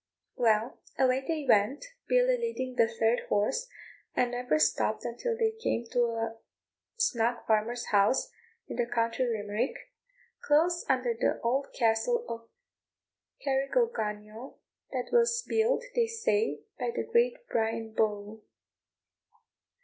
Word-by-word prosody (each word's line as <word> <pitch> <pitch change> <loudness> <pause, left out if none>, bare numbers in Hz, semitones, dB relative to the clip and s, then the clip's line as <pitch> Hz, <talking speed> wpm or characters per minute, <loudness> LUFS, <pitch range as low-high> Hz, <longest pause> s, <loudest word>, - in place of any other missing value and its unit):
Well, 225 -1 +1 0.2
away 260 0 +3
they 320 -3 -1
went, 225 - +3 0.2
Billy - - +4
leading 460 - -3
the 230 - +4
third 225 +1 +1
horse, 340 - +1 0.5
and 245 -1 +2
never 245 -9 0
stopped 155 +8 +1
until 455 - -2
they 450 -1 +2
came 440 - -2
to 245 -1 +3
a 225 -1 -3 0.6
snug 240 - +1
farmer's 225 +2 +1
house, 205 +4 +3 0.4
in - - -6
the 240 -1 +1
county 230 +1 0
Limerick, 220 +1 -1 0.7
close 335 +4 +3
under 255 -2 +2
the 225 - 0
old 260 +4 +1
castle 235 - +2
of 230 0 -7 1.0
Carrigogunniel, 265 - -1 0.3
that 255 -2 -3
was 470 0 +3
built, 455 +3 +2
they 475 -2 +2
say, 450 -1 0 0.2
by - - -1
the 470 - -2
great 480 +1 +2
Brian 225 -1 -1
Boru. 210 0 -1
245 Hz, 125 wpm, -29 LUFS, -, 1.0 s, Billy